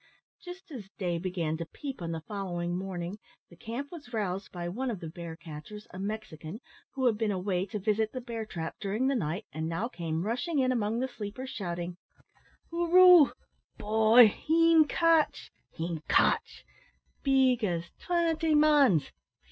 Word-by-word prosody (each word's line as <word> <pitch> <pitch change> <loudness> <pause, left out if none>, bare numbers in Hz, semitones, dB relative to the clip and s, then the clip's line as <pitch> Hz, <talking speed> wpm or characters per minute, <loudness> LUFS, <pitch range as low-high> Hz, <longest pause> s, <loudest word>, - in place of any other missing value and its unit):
Just 355 -1 -10
as 220 -9 -8
day 175 -4 -1
began 170 -3 -2
to 165 - -4
peep 275 -7 -7
on 165 -1 -3
the 165 -1 -4
following 175 -4 -3
morning, 185 +1 -5 0.3
the - - -14
camp 235 +10 -6
was 295 -8 -10
roused 195 -4 -3
by 175 -1 -5
one 250 +9 -3
of 215 -6 -4
the 165 -3 -7
bear 170 -1 -7
catchers, 165 +7 -10
a 185 - -8
Mexican, 200 -3 -6 0.4
who 260 -1 -1
had 225 -3 +2
been 220 -2 +1
away 190 -1 -1
to 210 - -4
visit 215 +2 0
the 255 - -5
bear 235 -2 -5
trap 165 -6 -6
during 210 +5 -1
the 275 - +2
night, 170 -4 -2
and 160 +1 -3
now 175 +8 -2
came 165 -7 -3
rushing 270 +9 -1
in 255 -2 +3
among 225 -2 0
the 260 - 0
sleepers, 245 +2 -7
shouting 175 -2 -4 0.7
"Hoor 340 0 -1
roo! 360 -4 +8 0.5
boy, 220 +2 +6
him 325 +5 +4
cotch, 330 0 +2 0.2
him 165 -1 -4
cotch! - - +2 0.6
big 265 -3 +3
as 170 -4 -2
twinty 330 -2 +1
mans! 290 - +4
210 Hz, 165 wpm, -29 LUFS, 175-265 Hz, 0.7 s, roo